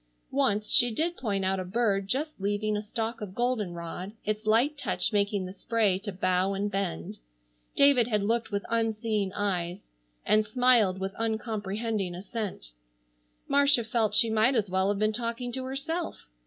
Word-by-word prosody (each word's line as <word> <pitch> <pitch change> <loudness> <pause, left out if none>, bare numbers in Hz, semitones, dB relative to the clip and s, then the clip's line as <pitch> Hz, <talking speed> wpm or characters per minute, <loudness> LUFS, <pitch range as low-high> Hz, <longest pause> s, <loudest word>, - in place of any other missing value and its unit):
Once 215 -7 +1
she 245 -3 +6
did 325 +9 -1
point 200 - -2
out 190 0 0
a - - -2
bird 195 0 0
just 285 +1 -2
leaving 205 +2 0
a 210 - -1
stalk 225 +2 -4
of 195 -2 -7
goldenrod, 190 -6 -3
its 215 +1 -2
light 240 +8 +3
touch 285 - -1
making 200 -1 +1
the 185 - -7
spray 205 -2 +1
to 205 +1 -5
bow 185 +1 +1
and 200 +1 -2
bend. 135 - -3 0.6
David 280 -5 +5
had 210 -4 0
looked 230 +3 0
with 200 -1 -3
unseeing 220 -3 0
eyes, 185 -2 -2 0.4
and 215 0 +4
smiled 215 -4 +3
with 190 0 -3
uncomprehending 220 -3 -2
assent. 195 - -6 0.8
Marcia 280 -3 +4
felt 220 -1 0
she 230 - +5
might 220 +5 +3
as 205 -5 0
well 190 +1 +2
have 205 - 0
been 215 +1 +1
talking 235 +2 -3
to 260 +1 -3
herself. 315 +6 -4
215 Hz, 165 wpm, -28 LUFS, 195-235 Hz, 0.8 s, she